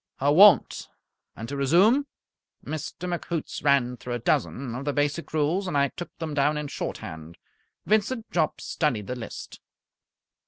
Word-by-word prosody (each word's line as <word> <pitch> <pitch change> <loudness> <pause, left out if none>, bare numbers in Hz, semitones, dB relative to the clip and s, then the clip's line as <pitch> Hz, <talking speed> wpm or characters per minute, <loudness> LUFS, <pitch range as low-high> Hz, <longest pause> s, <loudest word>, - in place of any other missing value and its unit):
"I 140 - +2
won't. 195 +7 +6 0.5
And 115 - -7
to 140 - -5
resume." 190 - +4 0.6
Mr. 155 +3 -5
McHoots 170 -2 -4
ran 135 -4 +2
through 120 0 -5
a - - -1
dozen 120 +1 -1
of 125 +3 -5
the 145 0 -1
basic 145 +3 -1
rules, 160 +6 0
and 150 - -1
I 140 0 +3
took 175 - -8
them 160 -3 -4
down 145 +1 +2
in 150 -1 -4
shorthand. 80 - -6 0.5
Vincent 220 +3 0
Jopp 160 -3 0
studied 125 - -1
the 125 - -4
list. 120 - -8
145 Hz, 155 wpm, -26 LUFS, 130-175 Hz, 0.6 s, won't